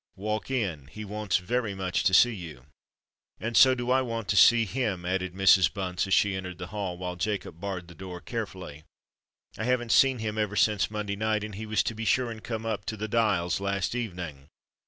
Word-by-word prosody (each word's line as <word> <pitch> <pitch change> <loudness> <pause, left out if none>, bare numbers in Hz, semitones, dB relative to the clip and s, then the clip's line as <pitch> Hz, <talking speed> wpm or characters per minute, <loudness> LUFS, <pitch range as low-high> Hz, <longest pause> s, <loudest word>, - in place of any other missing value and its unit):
"Walk 105 +4 -3
in:—he 105 - -3
wants 105 -1 -1
very 105 +2 -2
much 95 -2 -1
to 95 - +3
see 120 +5 +6
you." 80 - -9 0.7
"And 115 +1 -3
so 130 -1 +7
do 120 0 -2
I 130 +1 +4
want 115 -4 -4
to - - +2
see 115 +4 +7
him," 105 -5 -2
added 95 0 -2
Mrs. 95 -1 +5
Bunce 95 -1 -2
as 95 - 0
she 100 -1 +3
entered 90 -1 -5
the 90 +1 -7
hall, 100 -4 -3
while 90 0 -4
Jacob 90 -2 -3
barred 95 -3 -4
the 85 - -12
door 90 +1 -8
carefully. 95 -8 -6 0.8
"I 110 - -2
haven't 120 -2 0
seen 135 -1 +5
him 110 -1 -3
ever 105 -1 -1
since 105 -1 +2
Monday 105 -2 -3
night; 110 0 0
and 105 -1 -6
he 110 +3 -6
was 110 0 +1
to - - -2
be 115 +1 -6
sure 125 +2 +2
and 110 -1 -9
come 115 -1 -4
up 105 -3 -3
to 110 - -4
the 110 +1 -3
Dials 105 -7 +1
last 100 0 -1
evening. 90 - -5
105 Hz, 210 wpm, -27 LUFS, 90-110 Hz, 0.8 s, so